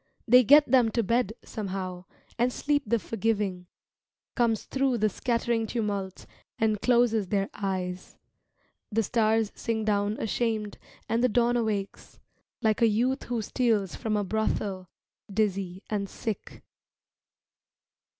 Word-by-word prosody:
They 250 +2 +7
get 290 +6 +7
them 245 -2 +4
to 235 - +1
bed, 230 0 +1
somehow, 185 -4 -5 0.3
And 245 +1 +3
sleep 290 +3 0
the 235 - +3
forgiving, 210 -5 -2 0.7
Comes 230 -3 +1
thru 270 -2 0
the 215 -1 +2
scattering 235 +1 -1
tumult 205 -5 -3 0.3
And 215 -2 +1
closes 235 -4 +3
their 195 0 -1
eyes. 185 -2 -4 0.7
The 225 +1 +1
stars 220 0 +1
sink 220 -1 -2
down 205 0 +1
ashamed 220 -1 -2 0.3
And 230 +2 0
the 250 - +4
dawn 240 +1 +2
awakes, 215 -4 -3 0.4
Like 220 0 +2
a 230 - +6
youth 245 +5 0
who 235 -2 -2
steals 215 -5 0
from 215 -1 -1
a 205 - 0
brothel, 195 -2 -2 0.4
Dizzy 195 -3 -1
and 200 -2 -2
sick. 220 +1 -6
220 Hz, 130 wpm, -27 LUFS, 200-235 Hz, 0.7 s, They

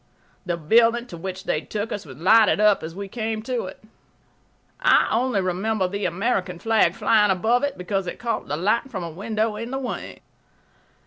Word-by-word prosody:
The 175 -1 -1
building 230 +8 +3
to 210 - -10
which 185 +2 -6
they 155 - -1
took 210 +4 -4
us 200 -6 -5
was 130 -1 -11
lighted 210 +6 +5
up 210 -1 +4
as 165 +1 -7
we 200 +1 -5
came 220 0 -3
to 245 -2 -2
it. 185 - -10 1.0
I - - +4
only 235 -3 +1
remember 190 +2 0
the 200 +2 -3
American 185 0 -1
flag 225 +4 +2
flying 210 -2 +3
above 220 +7 +2
it 285 -1 -2
because 190 +1 -2
it - - -5
caught 230 -2 -3
the 150 - -2
light 215 - +1
from 190 -7 -5
a 170 - -5
window 215 +4 -2
in 230 +2 -5
the 270 - -3
wing. 265 -2 -5
210 Hz, 190 wpm, -23 LUFS, 185-230 Hz, 1.0 s, lighted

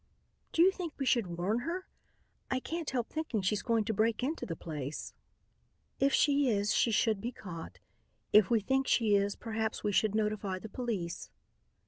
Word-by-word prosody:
"Do 330 - +5
you 380 - +6
think 355 -5 -5
we 275 - -2
should 205 -10 +1
warn 200 +7 0
her? 340 +8 -4 0.6
I 260 - +1
can't 330 +3 -4
help 245 -3 -2
thinking 310 -10 -2
she's 205 +2 +1
going 230 -3 +1
to 220 - -1
break 220 +3 +1
into 305 +5 -2
the 165 - -3
place." 150 -3 -5 0.9
"If 275 +1 +3
she 285 -1 +3
is, 205 -2 +1
she - - +3
should 220 -2 +2
be 240 - -3
caught. 170 -8 -8 0.6
If 210 -2 +7
we 230 -2 +3
think 265 +5 +1
she 220 -3 +3
is, 200 0 +2
perhaps 220 -1 -3
we 210 - +1
should 215 +1 +2
notify 210 -3 -1
the 220 +4 -8
police." 205 -8 -4
220 Hz, 180 wpm, -32 LUFS, 200-260 Hz, 0.9 s, If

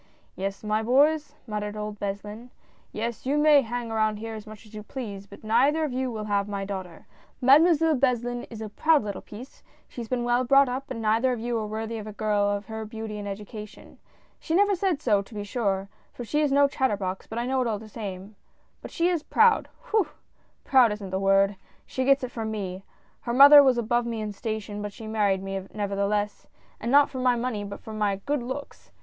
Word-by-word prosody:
"Yes, 195 +2 -4
my 215 +1 0
boys," 290 +5 +2
muttered 210 -2 -4
old 210 0 -5
Beslin, 205 +4 -5 0.2
" - - -34
yes, 235 +3 -4
you 285 +2 +2
may 295 -1 +6
hang 240 -1 -4
around 215 -1 +1
here 225 +1 -6
as 215 0 -8
much 215 +1 -12
as 215 - -18
you 215 - -6
please, 205 -4 -7
but 200 - -14
neither 265 +9 +3
of 295 -5 -2
you 260 0 -1
will 220 -3 -5
have 200 -1 0
my 200 -1 -4
daughter 185 -4 -7 0.2
— - - -33
Mademoiselle 320 +2 +6
Beslin 245 -2 0
is 225 -2 -8
a 215 - -5
proud 310 +6 +3
little 200 -2 -5
piece; 240 +6 -12 0.3
she 245 - -8
has 230 - -7
been 245 0 -1
well 240 +1 +2
brought 275 +2 +5
up, 265 +3 -4
and 225 - -5
neither 225 +4 +2
of 245 - -2
you 240 +1 -2
are 215 - -3
worthy 220 +1 -4
of 215 - -8
a 215 - -7
girl 210 -1 +1
of 205 0 -2
her 220 -1 -6
beauty 220 -1 -6
and 205 - -6
education. 210 +1 -9 0.2
" - - -36
She 320 - -2
never 405 +2 +4
said 360 -5 -1
so, 205 -4 +3
to 205 +3 -13
be 205 - -4
sure 200 -3 -1
— - - -37
for 245 - -6
she 300 +6 0
is 295 -2 +1
no 280 +1 +5
chat 265 -1 0
terbox, 190 -2 -4
but 220 - -6
I 240 - -1
know 260 +1 0
it 250 - 0
all 220 -2 -1
the 215 +2 -11
same 200 -2 -7 0.2
— - - -41
but - - -8
she 335 - 0
is 350 -3 0
proud, 450 +8 +3 0.2
whew! 430 -6 +3 0.6
proud 255 -5 +5
isn't 200 -3 -7
the 190 - -1
word 195 0 +3
— - - -34
she 260 - -3
gets 275 +1 +4
that 255 -1 -5
from 225 -2 -4
me. 195 -3 -5 0.4
Her 235 - -4
mother 285 +3 +10
was 260 -3 +3
above 240 +1 0
me 230 -1 -3
in 215 -1 -3
station, 210 0 -5
but 205 -1 -5
she 225 - -10
married 205 -3 0
me, 195 0 -3
nevertheless 205 0 -1 0.2
— - - -33
and 235 - -2
not 285 +1 +5
for 260 - -5
my 250 -1 +3
money 235 -3 -2
but 200 0 -7
for 220 - -9
my 210 -2 0
good 290 -2 0
looks. 260 +4 -7
220 Hz, 240 wpm, -26 LUFS, 205-260 Hz, 0.6 s, mother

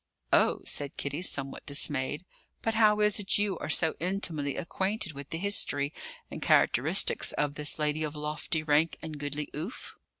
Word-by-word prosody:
"Oh!" - - +4
said 145 -1 -1
Kitty, 145 +3 -3
somewhat 140 -6 -1
dismayed. 145 +2 -1 0.4
"But 225 - 0
how 215 -1 +4
is 210 0 +3
it 200 -1 0
you 205 -3 0
are - - -5
so 160 +1 +5
intimately 165 -6 -2
acquainted 190 0 -2
with 140 0 -9
the 165 - -3
history 160 -7 0 0.4
and - - -7
characteristics - - +3
of 145 -1 -1
this 150 +1 0
lady 150 0 0
of 155 -1 -3
lofty 150 +1 -2
rank 155 +2 +2
and 155 -2 -6
goodly 145 +1 -3
oof?" 170 +11 -5
155 Hz, 165 wpm, -29 LUFS, 145-190 Hz, 0.4 s, so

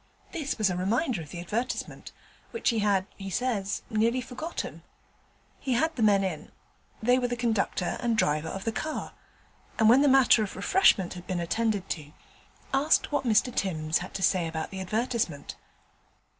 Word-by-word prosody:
This 305 -5 -3
was 210 -4 +2
a - - -2
reminder 220 - 0
of 150 - -10
the 170 - -7
advertisement, 215 +8 -4 0.4
which 460 - 0
he 230 - 0
had, 200 -2 +2
he 195 -1 -6
says, 205 -2 -1
nearly 230 +3 +1
forgotten. 260 +7 -6 0.8
He 260 - -1
had 320 +7 +1
the 245 - -3
men 205 -2 +4
in 180 -5 -4 0.5
they 250 +3 +4
were 245 - 0
the 245 - -2
conductor 220 -6 0
and 235 -2 0
driver 150 -4 +1
of 195 - -5
the 225 - -1
car 310 +7 -4 0.6
and 220 - +4
when 250 +4 +7
the 290 - +4
matter 265 -4 +6
of 210 - -3
refreshment 195 - +3
had 180 -1 -10
been 180 -1 -2
attended 205 +2 -1
to, 150 -2 -5 0.6
asked 290 +3 +3
what 290 - 0
Mr 230 +2 +3
Timms 160 -4 0
had 180 - -5
had - - -18
to 190 - -2
say 180 -3 +2
about 160 -1 -4
the 190 - -6
advertisement. 215 - -2
215 Hz, 180 wpm, -28 LUFS, 185-250 Hz, 0.8 s, when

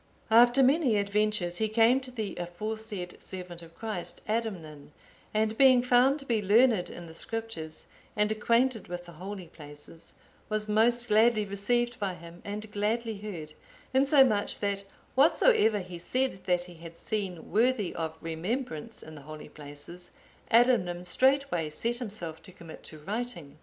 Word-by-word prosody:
After 240 +4 +7
many 265 -4 +3
adventures 200 -3 0
he 220 - +1
came 230 +4 +4
to 260 - -8
the 220 -5 -4
aforesaid 195 +1 -5
servant 180 -2 -7
of 165 0 -14
Christ, 215 -6 -5
Adamnan, 170 -10 -4 0.4
and 215 +1 0
being 260 -2 +7
found 250 +3 +4
to 275 - -9
be 230 -4 +1
learned 210 -1 +4
in 175 - -9
the 160 - -11
Scriptures, 170 -6 -5 0.3
and 210 0 +2
acquainted 230 +2 +1
with 175 0 -6
the 175 - -11
holy 185 +3 -7
places, 150 +1 -11 0.4
was 215 0 0
most 235 +3 +3
gladly 215 0 +4
received 240 +5 0
by 195 -3 -2
him 170 0 -12
and 210 +1 -6
gladly 215 +1 -1
heard, 170 -8 -7 0.4
insomuch 265 -6 +4
that 200 -1 -2 0.3
whatsoever 285 - +4
he 180 -3 -7
said 255 0 -1
that 180 -1 +1
he 180 0 -11
had 165 0 -12
seen 190 -5 -4
worthy 225 -3 +2
of 160 -1 -4
remembrance 165 - -4
in 155 - -11
the 150 - -10
holy 155 +2 -10
places, 145 +5 -10 0.4
Adamnan 205 -8 +3
straightway 260 - +2
set 230 +10 -2
himself 200 -9 -5
to 190 - -12
commit 170 -3 -12
to 155 - -9
writing. 175 -4 -5
210 Hz, 150 wpm, -29 LUFS, 175-235 Hz, 0.4 s, After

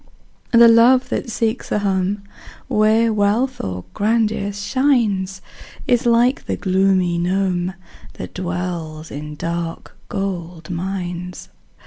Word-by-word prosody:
The 235 0 +8
love 240 +3 +5
that 245 - -2
seeks 225 +1 -2
a - - +2
home 200 0 0 0.4
Where 220 +1 +3
wealth 220 +5 +1
or 90 -1 -4
grandeur 215 -1 +1
shines, 205 -4 0 0.4
Is 245 -1 +2
like 240 +3 +3
the - - -1
gloomy 185 -2 +2
gnome, 185 0 0 0.4
That - - -8
dwells 175 -3 -4
in 150 +1 -6
dark 170 +1 -4
gold 175 -4 -4
mines. 180 0 -5
195 Hz, 110 wpm, -20 LUFS, 175-225 Hz, 0.4 s, The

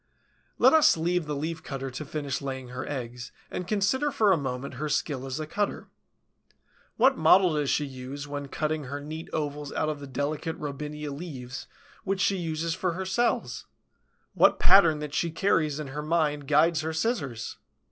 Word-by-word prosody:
Let - - +6
us 315 - +6
leave 170 0 0
the 150 - -2
Leaf 160 +3 -3
cutter 135 -1 -5
to 135 +4 -6
finish 145 -2 -3
laying 130 -2 -5
her 125 +1 -5
eggs, 120 -3 -5 0.2
and 180 - -4
consider 215 +9 +1
for 215 -5 +3
a - - +6
moment 130 -2 -4
her 155 - -1
skill 135 -2 -1
as 130 +3 -3
a 155 - -3
cutter. 205 +6 -2 1.1
What 260 +3 +4
model 175 +2 +6
does 150 -2 0
she 150 - +1
use, 135 +2 -7
when 145 0 -5
cutting 155 +1 -2
her 140 +3 -4
neat 155 +3 -7
ovals 145 -2 -3
out 155 - 0
of 150 -1 -3
the 140 - -8
delicate 145 +5 -3
Robinia 150 +1 -5
leaves, 135 -6 -7 0.4
which 195 0 -1
she 195 +1 +2
uses 165 -1 -2
for 180 +1 -1
her 190 +2 -4
cells? 235 +6 0 0.7
What - - +5
pattern 170 -5 +6
that 150 -1 -5
she 170 - +1
carries 155 -4 +1
in 150 -3 -5
her 145 +3 -4
mind 150 -3 0
guides 155 +2 +4
her 160 +1 -3
scissors? 150 - -2
150 Hz, 180 wpm, -27 LUFS, 140-170 Hz, 1.1 s, Let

